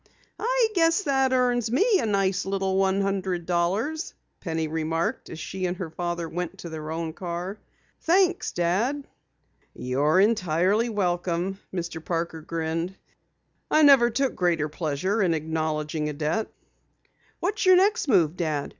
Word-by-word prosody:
"I - - +2
guess 330 +1 +3
that 270 -4 +2
earns 245 -3 +2
me 400 - +3
a 230 - -1
nice 195 -2 +1
little 195 -1 -1
one 195 0 +2
hundred 190 -3 -1
dollars!" 200 - -1 0.2
Penny 160 -3 -2
remarked 160 +1 -2
as 160 - -7
she 185 +3 -3
and 180 +1 -3
her 180 -4 -5
father 175 0 -3
went 180 +3 -5
to 175 - -8
their 155 -1 -6
own 160 0 -3
car. 180 +4 -5 0.4
"Thanks, 360 +1 +2
Dad." 220 +12 0 0.7
"You're 145 +7 +1
entirely 200 +1 +2
welcome," 180 -2 -1
Mr. 170 -3 -5
Parker 165 -1 -3
grinned. 165 +3 -3 0.7
"I 310 - +4
never 270 -5 +7
took 270 +2 0
greater 170 -4 +1
pleasure 165 +7 -1
in 175 -4 +2
acknowledging 155 -1 -2
a - - -4
debt." 155 +9 -1 0.9
"What's 395 +1 -1
your 370 - +8
next 400 +1 +3
move, 175 - +3
Dad? 155 -5 -2
185 Hz, 145 wpm, -25 LUFS, 165-235 Hz, 0.9 s, your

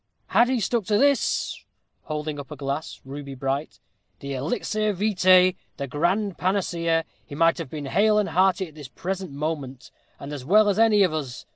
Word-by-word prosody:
"Had 240 +1 +4
he 260 -2 +1
stuck 230 0 0
to 205 +2 +2
this" 280 +3 +1 0.4
holding 150 -1 -4
up 140 - -8
a 150 - -7
glass, 140 +3 -4
ruby 140 0 -7
bright 135 +3 -3 0.4
"the 140 -1 -5
elixir 210 - -1
vitæ 185 -2 +4 0.2
the 140 - -3
grand 175 +8 -1
panacea 170 -4 0 0.2
he 145 - -10
might 165 +3 +3
have 165 -5 -5
been 150 -1 -6
hale 210 +9 +3
and 210 - +1
hearty 190 0 +2
at 155 - -16
this 145 -3 -10
present 185 +4 -5
moment, 140 -3 -5 0.3
and 140 +1 -7
as 140 -3 -6
well 205 +8 +5
as 200 +1 0
any 215 -3 +5
of 180 -4 +1
us. 135 -6 -5
165 Hz, 180 wpm, -24 LUFS, 145-200 Hz, 0.4 s, well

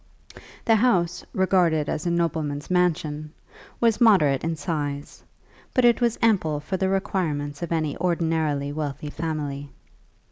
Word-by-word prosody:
The 225 -1 +5
house, 180 -7 +1
regarded 175 -5 +2
as 160 +3 -2
a - - +2
nobleman's 160 -3 -1
mansion, 155 -4 0 0.5
was 230 0 +2
moderate 155 - +5
in 165 0 -1
size, 145 -4 -4 0.5
but 255 - +4
it 240 +1 +4
was 235 -2 +2
ample 180 -10 +2
for 150 +6 -4
the 190 0 0
requirements 155 -7 -2
of 170 - -4
any 155 -3 0
ordinarily 160 -5 0
wealthy 145 -1 -4
family. 145 -3 -4
165 Hz, 135 wpm, -24 LUFS, 150-185 Hz, 0.5 s, The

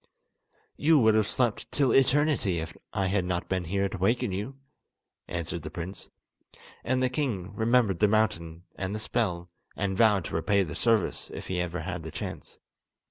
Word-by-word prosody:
"You 160 +1 +4
would 110 -5 +5
have 110 -1 +3
slept 120 -4 0
till 140 -3 +2
eternity 135 - +3
if 80 0 -5 0.2
I 95 - 0
had 95 0 +1
not 90 -1 -2
been 95 -2 -1
here 100 +3 0
to 95 - -6
waken 115 +4 +1
you," 105 +9 -4 0.7
answered 85 0 -4
the 75 - -6
prince. 85 +4 -7 0.7
And 130 +1 +1
the - - +4
king 115 -9 -2
remembered 110 -4 +2
the 105 - +5
mountain, 85 -6 0
and 100 +1 -3
the - - -3
spell, 90 -7 -2 0.2
and 95 -1 -1
vowed 105 -4 +4
to - - -6
repay 100 +5 +2
the 80 - -6
service 115 -5 +1
if - - -7
he 90 -1 0
ever 90 0 -3
had - - -5
a - - -6
chance. - - -7
100 Hz, 180 wpm, -28 LUFS, 90-115 Hz, 0.7 s, would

